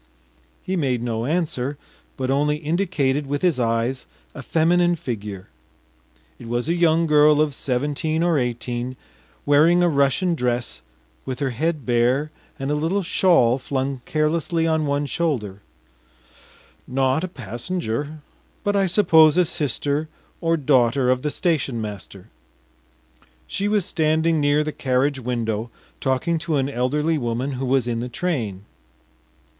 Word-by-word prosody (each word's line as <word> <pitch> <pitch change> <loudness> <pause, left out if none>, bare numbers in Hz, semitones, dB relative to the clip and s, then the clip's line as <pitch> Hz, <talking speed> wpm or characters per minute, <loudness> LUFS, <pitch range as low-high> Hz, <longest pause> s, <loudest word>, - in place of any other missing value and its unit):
He 190 - -2
made 130 -8 0
no 115 0 -2
answer, 145 -4 -1 0.4
but 130 -1 -1
only 150 +2 +2
indicated 150 -4 0
with 145 +3 -3
his 170 -8 +2
eyes 115 +2 -1 0.3
a - - -8
feminine 175 +2 +2
figure. 105 - -6 0.9
It 115 - -10
was 120 +3 -2
a 170 - +2
young 170 -1 +3
girl 150 -1 +5
of 155 -2 +2
seventeen 145 +5 -1
or 170 -4 +2
eighteen, 120 +1 -3 0.5
wearing 160 +5 +5
a - - +4
Russian 140 +5 +2
dress, 120 - -2 0.4
with 130 - -4
her 140 -1 -1
head 155 +4 -2
bare 125 +5 +1 0.3
and 135 -1 -3
a - - +2
little 165 +7 0
shawl 165 -9 +3
flung 135 0 -3
carelessly 160 +2 0
on 160 -2 +1
one 145 +1 0
shoulder; 125 - -2 1.3
not 135 +4 +1
a - - -1
passenger, 145 - -4 0.4
but 205 -1 0
I 195 -1 +3
suppose 165 -4 +5
a 180 - +5
sister 150 0 -2 0.3
or 165 0 +2
daughter 130 -3 +3
of 130 0 0
the 150 - -1
station 145 -7 0
master. 100 -3 -8 1.2
She 200 - -2
was 205 -3 +1
standing 160 +1 +1
near 145 +1 +3
the 155 - -3
carriage 135 0 0
window, 115 -2 -2 0.3
talking 135 +5 0
to 160 -1 -2
an 135 -1 0
elderly 150 +5 0
woman 120 +2 -2
who 130 0 -3
was 130 -2 +2
in 115 -1 -1
the 125 +1 -4
train. 115 - -3
145 Hz, 140 wpm, -22 LUFS, 125-160 Hz, 1.3 s, girl